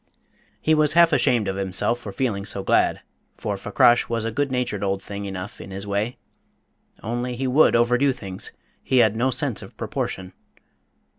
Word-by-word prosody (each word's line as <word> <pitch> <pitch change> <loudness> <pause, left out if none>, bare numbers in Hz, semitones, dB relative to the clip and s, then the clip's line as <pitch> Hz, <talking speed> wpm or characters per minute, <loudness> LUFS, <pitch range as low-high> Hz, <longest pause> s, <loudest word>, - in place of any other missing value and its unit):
He 155 - +2
was 155 -1 +3
half 170 -1 +5
ashamed 125 -7 +2
of 95 - -2
himself 95 +5 0
for 105 - -7
feeling 100 -1 -1
so 100 -1 -2
glad, - - +2 0.4
for - - -3
Fakrash 120 0 +3
was 115 -1 -1
a 115 - -1
good 145 +3 -1
natured 125 -6 -1
old 95 0 0
thing 100 0 -6
enough 95 0 -6
in - - -9
his 95 +1 -6
way. 105 +4 -2 0.9
Only 120 +3 -3
he 135 +2 -3
would 130 +3 +4
overdo 125 +4 +3
things: 95 -7 -5 0.3
he 130 - 0
had 110 -3 +5
no 125 +4 +1
sense 130 - -2
of - - -13
proportion. 95 0 -4
115 Hz, 175 wpm, -23 LUFS, 100-130 Hz, 0.9 s, half